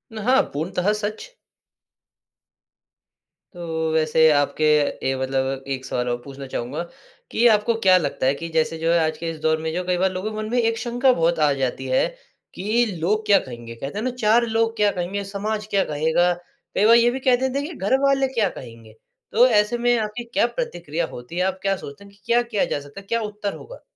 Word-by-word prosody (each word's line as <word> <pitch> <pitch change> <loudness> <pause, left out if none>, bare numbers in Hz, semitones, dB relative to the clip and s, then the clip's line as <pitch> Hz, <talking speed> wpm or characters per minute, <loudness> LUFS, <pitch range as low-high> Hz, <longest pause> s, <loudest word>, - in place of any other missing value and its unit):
हाँ, 250 +5 +3
पूर्णतः 180 +6 -1
सच। 215 - -4 2.2
तो 160 -2 -3
वैसे 160 0 +4
आपके 145 +2 0 0.4
ए 135 - +1
मतलब 135 0 -1
एक 130 0 -6
सवाल 125 -2 -2
और 120 - 0
पूछना 135 0 -9
चाहूँगा 125 +3 -4 0.5
कि 235 - +1
आपको 215 +1 +3
क्या 185 -2 +6
लगता 145 -6 -2
है 135 - +4
कि 165 +3 -6
जैसे 160 0 0
जो 165 +1 0
है 170 - +4
आज 155 - -2
के 165 - -4
इस 160 - -9
दौर 160 0 +2
में 160 0 -2
जो 175 - -1
है 180 - -4
कई 180 -1 +1
बार 190 +1 +1
लोगों 185 +4 -4
के 215 - -6
मन 215 0 -4
में 245 - +1
एक 230 -1 +1
शँका 245 +3 +2
बहुत 170 -4 +1
आ 150 -1 +4
जाती 130 -1 -2
है 130 0 +2 0.5
कि 220 +5 +1
लोग 210 +6 0
क्या 200 -2 +5
कहेंगे? 120 -4 -9
कहते 135 - -6
हैं 215 - -2
ना 255 - 0
4 235 -1 +3
लोग 225 0 0
क्या 210 -1 +3
कहेंगे? 190 +2 -3
समाज 210 +2 -4
क्या 200 -1 +3
कहेगा? 160 +4 +1 0.4
कई 205 - +3
बार 230 +2 +7
ये 235 0 +5
भी 260 - -4
कह 255 -1 +3
देते 265 +2 -1
हैं 285 - -3
कि 350 - -8
घर 205 +5 +1
वाले 275 -1 +3
क्या 220 -6 +2
कहेंगे? 115 -6 -12 0.4
तो 240 +4 +6
ऐसे 210 0 +2
में 240 0 +2
आपकी 220 +2 -3
क्या - - +3
प्रतिक्रिया 175 - -3
होती 120 +7 -10
है, - - +1
आप 190 0 -2
क्या 195 0 +1
सोचते 140 +4 -10
हैं 200 0 -16
कि 200 - -24
क्या 235 +1 +3
किया 235 -4 -1
जा - - -2
सकता 145 +7 -11
है? 195 - -23
क्या 230 +2 0
उत्तर 210 -1 -4
होगा? - - -12
195 Hz, 220 wpm, -22 LUFS, 155-225 Hz, 2.2 s, बार